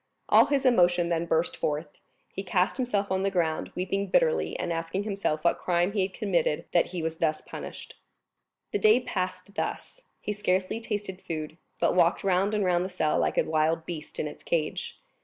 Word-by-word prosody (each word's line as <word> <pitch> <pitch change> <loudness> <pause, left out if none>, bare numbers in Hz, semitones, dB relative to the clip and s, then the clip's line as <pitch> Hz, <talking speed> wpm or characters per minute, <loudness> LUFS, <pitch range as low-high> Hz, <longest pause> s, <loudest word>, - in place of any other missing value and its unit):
All - - +7
his 280 -2 +1
emotion 175 -7 +4
then 170 0 0
burst 165 +1 +1
forth; 150 +3 -2 0.5
he - - -3
cast 185 +2 +1
himself 210 -7 -1
on 190 0 +1
the 195 - +1
ground, 170 -4 -1
weeping 195 +2 -1
bitterly, - - +2
and 170 - -2
asking 165 +4 -2
himself 195 -7 -2
what 170 - +2
crime 175 +1 +1
he 205 - +1
had 190 +1 0
committed 175 -8 0
that 175 - +3
he 175 -2 -5
was 160 0 -2
thus 155 -2 0
punished. - - -8 0.8
The - - 0
day 215 +4 +6
passed 185 -4 -4
thus; - - -4 0.2
he 210 - -3
scarcely 190 +1 0
tasted 205 -4 -4
food, 155 -1 -5 0.2
but - - +3
walked 175 0 +3
round 195 +2 +2
and 205 -2 +1
round 175 -1 +2
the 185 - -3
cell 170 -5 +1
like - - 0
a - - +5
wild 160 +1 +1
beast 160 -3 -7
in 155 - -1
its 150 - -9
cage. 155 -3 -2
180 Hz, 195 wpm, -27 LUFS, 165-200 Hz, 0.8 s, All